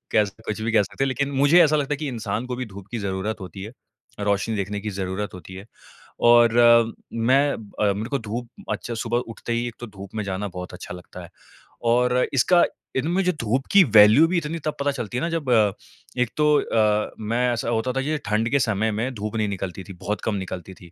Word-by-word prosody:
कह 105 - +4 0.2
कुछ 105 +1 -3
भी 110 +1 -1
कह 110 -2 +5
सकते 135 - -3
हैं - - 0
लेकिन 140 +1 -1
मुझे 145 +6 +5
ऐसा 155 0 +3
लगता 145 0 -1
है - - -4
कि 150 -1 -4
इंसान 115 0 -3
को 125 -1 -4
भी 130 - -4
धूप 100 -2 -11
की 120 - -3
ज़रुरत 100 +2 -3
होती 95 +1 -8
है, 110 - -8 0.5
रोशनी 100 +2 0
देखने 100 +1 -3
की 105 +1 -4
ज़रुरत 95 +1 -4
होती 90 +1 -10
है। 95 +2 -9 0.5
और 120 -1 +5 0.2
मैं 130 +5 +3
अ, 105 -1 -1
मेरे 110 +5 -4
को 140 - -1
धूप 120 +1 -4 0.2
अच्छा 120 - -4
सुबह 115 +1 -1 0.2
उठते 115 - -4
ही 120 +1 -1
एक 120 - -7
तो 120 - -7
धूप 100 0 -11
में 105 - -2
जाना 100 +1 -3
बहुत 90 -1 -8
अच्छा 90 - -8
लगता 90 0 -11
है, 85 - -11 0.5
और 125 +1 +2 0.2
इसका 175 +7 +4 0.3
इनमें 170 +8 +1
जो 180 - +2
धूप 120 +5 0
की 200 -2 +8
वैल्यू 110 +3 +7
भी 180 0 0
इतनी 165 +1 -3
तब 155 - -1
पता 140 0 +1
चलती 120 -4 -5
है - - -1
ना, 170 - 0
जब 160 -6 -3 0.7
एक 125 - +1
तो 150 - +3 0.2
अ, 105 -1 +1
मैं 120 +3 0
ऐसा 115 0 -2
होता 115 +2 0
था 135 - -1
ये 155 +2 -1
ठंड 110 +2 0
के 140 - +3
समय 110 -1 +1
में 115 +5 -2
धूप 105 +1 -5
नहीं 110 -1 0
निकलती 95 -1 -5
थी, 95 - -10
बहुत 100 +3 -4
कम 110 - -1
निकलती 95 -1 -6
थी। 90 -2 -16
115 Hz, 230 wpm, -23 LUFS, 100-130 Hz, 0.7 s, की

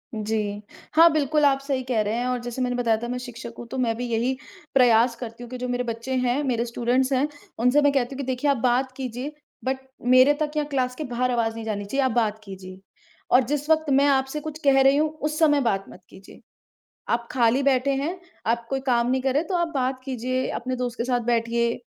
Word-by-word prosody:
जी। 210 -1 -2 0.3
हाँ, 330 +1 +8
बिल्कुल, 300 0 +2
आप 275 -1 +4
सही 275 -2 -2
कह 245 -4 0
रहे 210 +1 -1
हैं, 245 - -1
और 250 -1 -1
जैसे 245 +1 -5
मैंने 250 -1 0
बताया 235 -3 +2
था, - - -2
मैं 250 +1 -3
शिक्षक 235 -1 -8
हूँ 235 - -8
तो 265 - -4
मैं 230 -3 +1
भी 245 - -3
यही 235 +3 +1 0.4
प्रयास 240 -2 +5
करती 235 0 -8
हूँ 240 - -10
कि 255 - -6
जो 250 0 -4
मेरे 245 0 -1
बच्चे 235 +2 -4
हैं, 250 +2 +1
मेरे 240 -4 0
स्टूडेंट्स 245 +3 0
हैं, 270 +3 +2 0.3
उनसे 250 +5 +4
मैं 285 - +4
कहती 270 -1 0
हूँ - - -8
कि, 280 - -3
"देखिए 260 +3 0
आप 280 - 0
बात 255 +2 +1
कीजिए 260 +2 -5 0.3
बट 265 0 0 0.3
मेरे 255 +3 +6
तक 300 -1 0
या 300 - +2
क्लास 260 -3 -1
के 310 - -5
बाहर 250 -1 -1
आवाज़ 225 -2 0
नहीं 225 - -6
जानी 205 -2 -3
चाहिए, 270 +6 0
आप 260 - +1
बात 220 -2 0
कीजिए। 190 -2 -10 0.5
और 255 - +6
जिस 295 +3 -2
वक़्त 315 -1 +3
मैं 275 +1 +4
आपसे 270 +1 +1
कुछ 310 0 -6
कह 275 -1 +5
रही 270 +1 +5
हूँ, 310 +1 +2
उस 305 0 -4
समय 295 -3 +4
बात 195 -6 0
मत 185 - -13
कीजिए। 190 - -15 0.7
आप 235 0 0
खाली 245 +1 +2
बैठे 270 0 +2
हैं, 305 +7 -2 0.3
आप 230 +1 0
कोई 270 - -1
काम 240 -1 +2
नहीं 260 0 +1
कर 265 -1 0
रहे, 290 - +3
तो 365 - -4
आप 345 -1 +1
बात 260 -1 -1
कीजिए, 255 0 -2
अपने 255 0 -3
दोस्त 245 -1 -4
के 235 - -1
साथ 250 -1 +1
बैठिए।" 235 +1 0
255 Hz, 240 wpm, -24 LUFS, 235-275 Hz, 0.7 s, हाँ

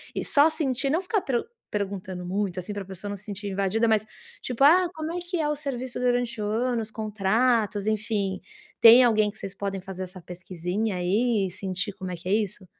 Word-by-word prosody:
e - - -1
só 295 +2 +5
sentir, 275 -4 -1
não 335 +4 +2
ficar 390 +1 0
pru 245 -3 -1 0.3
perguntando 190 -3 -4
muito, 190 0 -2
assim, 205 +4 -5
para 205 - -4
a - - -15
pessoa 195 +2 -7
não 205 - -3
sentir 205 0 -7
invadida, 200 +4 +1
mas, 215 -1 +3 0.4
tipo: 250 +2 -1
"Ah, 350 +4 +6
como 315 +1 -4
é 355 - -2
que 350 -1 -3
é 300 - +1
o 300 - 0
serviço 260 -4 -4
durante 245 -2 0
o - - -1
ano, 235 +2 0
os 220 0 -7
contratos", 215 0 +1
enfim. 210 -3 -1 0.4
Tem 235 +2 +10
alguém 215 -3 +3
que - - -17
vocês 195 -1 -7
podem 195 -1 -3
fazer 190 0 -6
essa 185 0 -9
pesquisinha, 180 +4 -3
aí, 205 +3 +1
e - - -8
sentir 190 +1 -4
como 185 -1 -6
é - - -3
que 175 - -10
é - - +3
isso? 205 -3 -1
210 Hz, 215 wpm, -26 LUFS, 190-245 Hz, 0.4 s, Tem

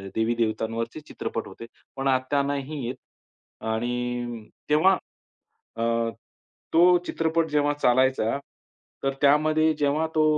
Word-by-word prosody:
देवी-देवतांवरचे 115 +2 -1
चित्रपट - - -4
होते. 115 - -10 0.3
पण 135 0 -2
आता 130 +2 +2
नाही 140 -1 -3
येत. 125 - -3 0.7
आणि 120 0 -2 0.2
तेव्हा 160 +6 +5 0.8
अ, 115 - -2 0.9
तो 175 +2 +6
चित्रपट 165 0 +1
जेव्हा 145 0 +2
चालायचा, 130 -3 +2 0.7
तर 135 - +1
त्यामध्ये 155 +2 +4
जेव्हा 150 +2 +1
तो 155 - +4
135 Hz, 105 wpm, -25 LUFS, 120-155 Hz, 0.9 s, तो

